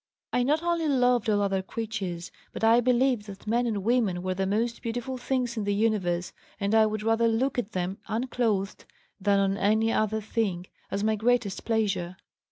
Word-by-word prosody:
I 250 - +3
not 300 +6 +1
only 340 -2 0
loved 250 -5 +2
all 205 -1 +2
other 195 -1 0
creatures, 190 -4 -5 0.2
but - - -6
I 230 +2 +6
believed 250 -2 +2
that 195 -1 -10
men 240 +3 +1
and 205 -4 -2
women 215 -6 +1
were 185 0 -1
the 190 +1 -1
most 230 +4 -1
beautiful 245 +2 -4
things 245 -2 -1
in 215 - -1
the 205 0 0
universe 190 -5 0 0.3
and 200 +1 0
I 220 -1 +6
would 215 0 -3
rather 225 +1 +3
look 245 +4 +1
at 225 -2 -4
them 185 +1 -2
(unclothed) 225 -4 -1 0.3
than 200 0 +2
on 195 0 +1
any 220 +3 +2
other 215 0 +1
thing, 205 -4 -2 0.2
as 200 +1 -2
my 220 0 +2
greatest 225 -2 0
pleasure. 195 -6 -1
220 Hz, 185 wpm, -27 LUFS, 195-240 Hz, 0.3 s, I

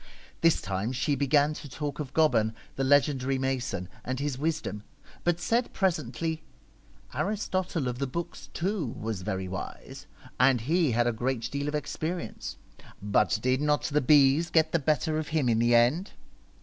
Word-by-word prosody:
This 165 -1 +4
time 100 +4 -2
she 135 +3 0
began 145 +2 +3
to 150 - -9
talk 145 +3 -4
of 140 -4 -4
Goban, 115 -9 +3 0.2
the 135 - -1
legendary 135 -1 +3
mason, 130 -8 -2 0.2
and 130 +1 -3
his 145 -1 -1
wisdom, 145 -7 -2 0.4
but 175 -1 +1
said 230 +7 0
presently, 165 -4 -1 0.4
' - - -26
Aristotle 185 -7 -1
of 125 0 -3
the 140 - -1
Books, 170 +6 -6
too, 175 - -2
was 110 -3 -3
very 95 +1 -3
wise, 90 0 -7 0.3
and 130 -2 +4
he 155 +1 +2
had 120 +1 +2
a 120 - +2
great 120 +1 -2
deal 140 0 -2
of 150 - -1
experience, 160 +3 -4 0.4
but 105 +2 +2
did 130 +2 +2
not 150 0 +2
the 150 0 +1
bees 145 +4 +5
get 160 -1 +3
the 170 - +2
better 155 +1 +1
of 155 - -4
him 155 -5 0
in 115 -1 +3
the 120 +1 +4
end 130 - +3
140 Hz, 170 wpm, -28 LUFS, 125-160 Hz, 0.4 s, bees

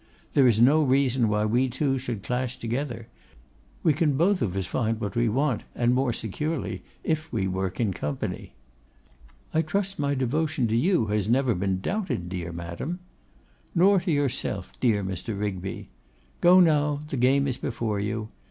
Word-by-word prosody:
There 135 -3 +5
is 115 -3 +3
no 140 +7 +6
reason 130 -4 +2
why 105 0 +1
we 125 +4 +2
two 135 +1 0
should 120 -6 -5
clash 125 +1 -2
together: 115 -1 -3 0.8
we 160 - +4
can 145 -2 +1
both 180 +4 +3
of 95 -3 -1
us 95 - -1
find 115 +1 -1
what 100 -3 -4
we 120 -1 +2
want, 130 0 +1
and 120 0 +2
more 130 -1 +2
securely 150 - -3 0.2
if 160 0 -1
we 100 -5 0
work 95 0 -3
in 110 -5 +1
company.' 75 -4 -4 1.0
'I 160 - +3
trust 195 +4 -2
my 140 -1 +1
devotion 135 0 0
to 110 - +1
you 155 - +3
has 105 0 0
never 130 0 +3
been 95 0 -1
doubted, 140 - -2
dear 90 -1 -4
madam.' 85 - -5 0.8
'Nor 190 +3 +5
to 175 0 -2
yourself, 135 -9 -1
dear 110 -5 +2
Mr. 95 +2 -4
Rigby. 95 -2 -4 0.5
Go 180 +2 +7
now: 150 -4 +3
the - - -3
game 135 +3 +3
is 130 - -2
before 115 -5 -2
you. 105 +2 -3
125 Hz, 170 wpm, -26 LUFS, 105-145 Hz, 1.0 s, Go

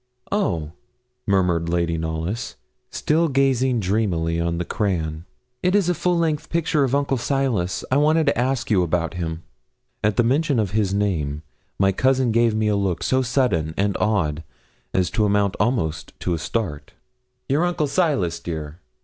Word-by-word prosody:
'Oh!' 85 - 0 0.6
murmured 90 -4 +2
Lady 85 -1 0
Knollys, 80 +7 -3 0.3
still 165 +2 +1
gazing 130 -3 +2
dreamily 90 -5 0
on 85 0 -1
the 85 - -2
crayon. 80 -6 -2 0.4
'It 180 +2 +2
is 205 -3 +3
the 180 - +2
full 175 +1 0
length 160 -2 -1
picture 165 -3 +1
of 135 0 +1
Uncle 140 -2 +1
Silas 115 - -1
I 130 - +4
want 155 +2 +3
to - - +2
ask 125 -1 -1
you 95 -4 +4
about 85 -1 0
him.' 85 -1 -4 0.6
At 105 -1 +1
mention 140 +3 +2
of 105 -5 0
his 105 -2 +1
name, 80 -8 -1 0.3
my 95 0 +3
cousin 130 +3 +2
gave 115 -1 +3
me 110 0 +1
a 105 - +2
look 100 -4 -1
so 130 0 +2
sudden 115 - 0
and 100 0 +1
odd 80 -8 0 0.5
as 90 -1 +1
to 105 - +1
amount 100 -1 +2
almost 95 -8 -1
to 90 - 0
a 80 - -2
start. 75 -7 -3 0.5
'Your 145 +5 +2
uncle 175 -3 0
Silas, 135 - 0
dear? 80 -1 -6
105 Hz, 165 wpm, -22 LUFS, 85-135 Hz, 0.6 s, I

